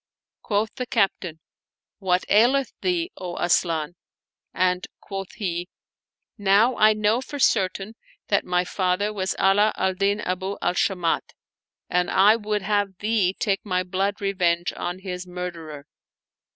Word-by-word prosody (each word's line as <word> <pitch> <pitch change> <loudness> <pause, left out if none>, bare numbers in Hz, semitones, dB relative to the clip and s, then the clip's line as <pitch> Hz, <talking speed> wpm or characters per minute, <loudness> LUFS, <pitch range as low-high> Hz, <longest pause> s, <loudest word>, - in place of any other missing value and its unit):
Quoth 215 +1 -1
the 250 -1 -3
Captain, 190 -8 0 0.6
"What 185 -2 +1
aileth 250 +5 +3
thee, 355 -1 0
O 180 -2 -6
Asian?" 170 -2 +1 0.6
and 180 0 0
quoth 195 -2 -7
he, 175 -3 -3 0.7
"Now 205 +5 +4
I 215 0 +5
know 215 +3 +1
for 285 +2 -7
certain 195 -4 +1 0.4
that - - +2
my 180 0 0
father 190 +3 0
was 190 -1 -2
Ala 205 +2 +4
al 190 0 +1
Din 200 +2 +1
Abu 190 +2 -3
al - - 0
Shamat, 180 -2 0 0.5
and 180 0 +1
I 205 +3 +5
would 210 -2 -2
have 200 -1 0
thee 210 -3 +1
take 195 -3 0
my 185 -3 0
blood 195 +2 -1
revenge 175 -3 0
on 175 +1 -4
his 185 -1 -6
murderer." 170 -5 -7
195 Hz, 140 wpm, -24 LUFS, 180-210 Hz, 0.7 s, I